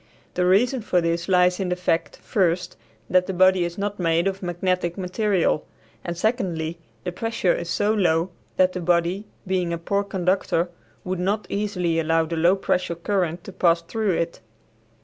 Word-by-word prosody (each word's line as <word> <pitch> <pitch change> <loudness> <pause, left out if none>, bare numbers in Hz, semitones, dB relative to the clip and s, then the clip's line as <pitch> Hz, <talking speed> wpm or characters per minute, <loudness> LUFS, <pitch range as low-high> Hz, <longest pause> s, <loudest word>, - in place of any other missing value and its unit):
The 180 0 +1
reason 240 +7 +3
for 180 -4 +1
this 170 +1 -1
lies 180 -1 +4
in 190 -2 -1
the 180 - +1
fact, 175 -2 -1
first, 180 -4 0 0.3
that 185 0 +3
the 190 - -3
body 185 0 +5
is 170 0 -4
not 205 0 -3
made 165 0 +2
of 195 0 -2
magnetic 175 0 -1
material, 185 -3 +1 0.4
and, 170 -1 -4
secondly, 175 -7 -1 0.2
the 180 - -3
pressure 215 -1 0
is 170 0 -4
so 210 +5 +1
low 175 -3 +2 0.3
that 185 0 +4
the 180 - -4
body 175 +4 +1 0.2
being 185 -2 0
a 170 - -1
poor 200 +4 0
conductor 185 -2 0 0.3
would 185 -1 -3
not 200 +3 0
easily 180 -5 0
allow 165 0 +2
the 165 +1 -4
low 170 +4 +4
pressure 180 -3 -1
current 175 -1 -1
to - - -8
pass 170 -3 +2
through 215 +2 -1
it. 170 0 -2
180 Hz, 175 wpm, -24 LUFS, 170-195 Hz, 0.4 s, body